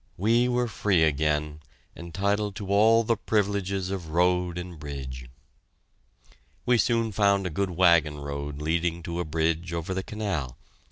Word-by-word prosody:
We 115 +6 +3
were 125 0 +1
free 100 -6 +1
again, 75 0 0 0.4
entitled 100 +4 -2
to 100 -1 -6
all 110 +3 +5
the 115 +1 +1
privileges 100 -3 -1
of 90 -5 -5
road 90 +1 +1
and 90 -2 -7
bridge. 65 -4 -7 1.4
We 120 -1 +3
soon 115 +1 +1
found 100 -1 +2
a 90 - -2
good 100 +4 -1
wagon 85 -4 +3
road 70 0 -5
leading 85 +2 -1
to 85 +1 -4
a 90 - -2
bridge 80 +2 -1
over 85 +2 -3
the 95 - -2
canal. 95 - -4
90 Hz, 150 wpm, -26 LUFS, 80-100 Hz, 1.4 s, all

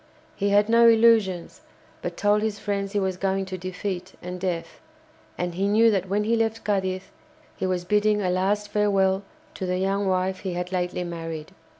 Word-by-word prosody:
He 200 0 0
had 205 +1 +4
no 230 +1 +6
illusions, 220 -6 +3 0.4
but - - -5
told 205 0 +3
his 215 -1 -1
friends 200 -1 -3
he 205 - +2
was 190 -2 -1
going 195 0 0
to 185 0 -5
defeat 185 0 -5
and 180 +1 -6
death, 175 -3 -3 0.6
and 175 -1 -2
he 195 +3 0
knew 225 +2 +5
that 190 -2 -1
when 205 +2 +1
he 225 +2 +2
left 225 0 -1
Cadiz 190 -2 -1 0.4
he 190 - -2
was 180 -1 -1
bidding 210 +2 +2
a 185 -3 0
last 200 +3 0
farewell 195 -2 +2 0.3
to 185 - -4
the 180 0 0
young 195 +1 0
wife 185 0 0
he 190 -2 -4
had 180 +1 -4
lately 180 -1 -1
married. 165 -2 -6
190 Hz, 190 wpm, -25 LUFS, 185-210 Hz, 0.6 s, no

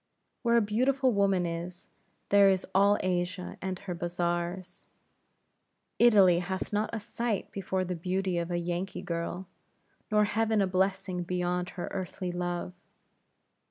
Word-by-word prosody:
Where 235 -2 +3
a - - +5
beautiful 255 +5 +2
woman 195 -3 +2
is, 170 +1 -5 0.4
there 200 -1 +6
is 190 -1 +1
all 200 +2 +5
Asia 180 0 -2
and 190 0 -3
her 180 0 -6
Bazars. 175 +1 -3 1.1
Italy 195 -7 +6
hath 190 +3 -4
not 210 +1 +1
a 230 - -3
sight 230 -1 -3
before 190 -1 -2
the 180 - -3
beauty 185 +1 -1
of 170 0 -3
a 175 - -1
Yankee 175 +2 -3
girl; 170 +1 -3 0.6
nor 210 -1 +4
heaven 220 +1 +1
a 195 - +4
blessing 190 0 0
beyond 180 0 -1
her 175 - -3
earthly 185 -1 -4
love. 175 0 -3
185 Hz, 140 wpm, -29 LUFS, 175-200 Hz, 1.1 s, there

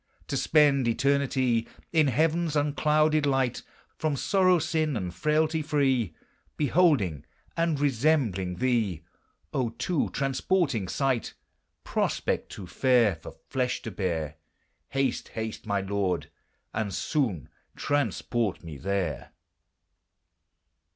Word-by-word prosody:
To - - -1
spend 145 -5 +4
eternity 130 -2 +1 0.3
In 155 -3 +4
heaven's 160 +3 +1
unclouded 150 +1 +2
light! 135 -3 +1 0.4
From 155 -2 0
sorrow, 185 +5 +3
sin, 155 -4 0
and 90 -4 -4
frailty 155 - +1
free, 135 - +1 0.4
Beholding 140 - +2 0.3
and 165 -3 +1
resembling 125 - +1
thee, 110 -10 0 0.5
O 125 -3 0
too 150 +7 -1
transporting 135 - 0
sight! 130 +1 -1 0.5
Prospect - - -1
too 95 - -8
fair 120 +1 +3
For 80 - -11
flesh 125 -1 -1
to 115 - -5
bear! 80 -6 -2 0.5
Haste! 135 -2 -1
haste! 110 -1 -6
my 100 -1 +1
Lord, 95 -1 -1 0.4
and 105 -2 -2
soon 105 - -1 0.3
transport 120 -8 -1
me 80 -4 -8
there! 95 0 -2
130 Hz, 105 wpm, -27 LUFS, 100-150 Hz, 0.5 s, spend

